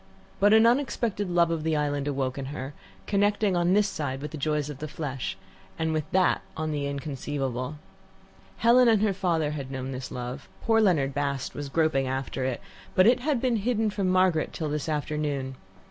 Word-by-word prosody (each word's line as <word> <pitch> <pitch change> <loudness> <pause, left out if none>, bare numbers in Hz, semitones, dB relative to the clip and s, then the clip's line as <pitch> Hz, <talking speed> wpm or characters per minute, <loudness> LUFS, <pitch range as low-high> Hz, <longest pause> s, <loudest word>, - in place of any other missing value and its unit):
But 205 +1 +5
an 220 +1 +7
unexpected 235 -5 +1
love 170 -1 +3
of 165 -2 -1
the 160 0 0
island 145 -1 -1
awoke 135 -1 -1
in 135 - -4
her, 135 0 -6 0.3
connecting 205 -1 +2
on 175 +1 +2
this 205 +1 +4
side 145 -8 -3
with 150 +1 -6
the - - -6
joys 150 0 0
of 145 -3 -7
the 155 - -4
flesh, 135 -8 -4 0.4
on 160 0 0 0.2
that 185 -1 +3 0.2
with 155 0 -2
the 145 -1 -1
inconceivable. 140 -2 -3 0.8
Helen 240 +2 +5
and 220 -2 +4
her 210 -2 +2
father 170 -5 0
had 140 -3 -5
known 130 0 -4
this 130 0 -5
love, 125 0 -6
poor 225 -1 +4
Leonard 150 -10 +2
Bast 140 -1 -2
was 145 -1 -5
groping 155 -3 +1
after 130 0 -3
it, 130 -2 -2 0.3
but 185 - +6
it 240 +3 +5
had 280 0 0
been 245 -2 +1
hidden 220 0 0
from 195 -2 -1
Margaret 185 -3 +2
till 155 -2 -3
this 150 +1 -2
afternoon. 145 -3 -2
155 Hz, 190 wpm, -27 LUFS, 140-195 Hz, 0.8 s, an